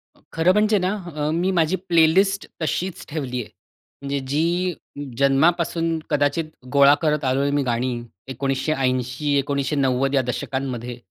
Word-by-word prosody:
अ, - - -26
खरं 165 +2 +3
म्हणजे 210 +1 +3
ना 185 - +1 0.2
अ, 150 0 -1
मी 175 +4 +1
माझी 160 +3 +2
प्लेलिस्ट 180 +4 +3
तशीच 180 +3 -2
ठेवली 135 -5 -3
आहे. 105 - -10 0.5
म्हणजे 140 0 -2
जी 175 +4 +1 0.4
जन्मापासून 165 +4 +2
कदाचित 145 +2 +1 0.3
गोळा 140 0 +7
करत 150 -3 +1
आलोय 135 +2 +1
मी 145 0 +1
गाणी 125 0 -1 0.4
1980-1990 135 0 0
या 135 - +4
दशकांमध्ये. 125 -1 -4
145 Hz, 125 wpm, -22 LUFS, 135-165 Hz, 0.5 s, गोळा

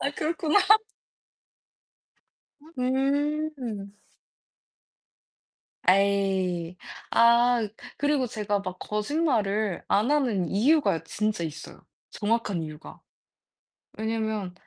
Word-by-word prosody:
아 280 - 0
그렇구나. 320 +4 +1 3.0
음. 210 -6 -6 2.0
에이. 190 -3 +1 0.3
아. 235 -1 +4 0.3
그리고 290 -2 +1
제가 210 -2 -2
막 185 -1 -6
거짓말을 210 - -1
안 215 +7 +2
하는 240 - +1
이유가 220 - +2
진짜 210 +1 -2
있어요 160 -1 -8 0.3
정확한 210 -4 -1
이유가. 155 -1 -9 1.0
왜냐면 220 -4 -2
210 Hz, 160 characters per minute, -26 LUFS, 190-240 Hz, 3.0 s, 아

